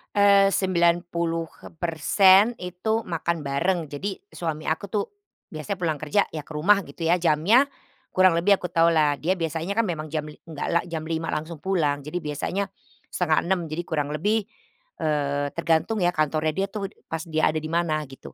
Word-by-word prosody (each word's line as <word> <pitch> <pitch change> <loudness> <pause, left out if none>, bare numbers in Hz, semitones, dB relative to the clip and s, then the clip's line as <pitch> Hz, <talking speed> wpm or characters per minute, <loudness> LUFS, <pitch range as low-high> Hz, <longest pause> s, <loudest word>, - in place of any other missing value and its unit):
Eee, 200 -1 +6
90%, 175 +2 +2
itu 185 +5 -2
makan 170 -2 -2
bareng, 165 +7 0
jadi, 190 +8 -4 0.2
suami 160 -2 -4
aku 160 +5 -1
tuh 205 0 0 0.5
biasanya 170 +5 -4
pulang 160 -5 -1
kerja, 155 +7 +2
ya 155 - -4
ke - - -13
rumah, 195 +7 +4
gitu 155 +4 -8
ya, 175 +2 +3
jamnya 180 - +4 0.5
kurang 185 -1 +6
lebih 180 +5 +4
aku 180 - -7
tahulah, 165 -3 +4
dia 185 +4 +1
biasanya 165 +5 -3
kan 230 - +3
memang 160 -5 -3
jam 155 -1 -2
li 150 - -9
nggak 160 -3 -6
lah 170 - +3
jam 160 -2 -4
5:00 165 0 -2
langsung 160 0 -4
pulang, 155 -7 0
jadi 150 +5 -5
biasanya 150 +6 -2 0.5
5:30, 180 +2 +1
jadi 170 +3 -3
kurang 150 -3 -2
lebih, 210 +8 +1 0.6
eee, 145 -2 0
tergantung 170 +6 +1
ya 175 - +4
kantornya 155 +1 +1
dia 195 - +1
tuh, 200 -3 -4 0.2
pas 160 0 -2
dia 155 -1 +2
ada 155 - -1
di 155 - -5
mana, 165 -2 0
gitu. 135 - -12
165 Hz, 170 wpm, -25 LUFS, 155-185 Hz, 0.6 s, Eee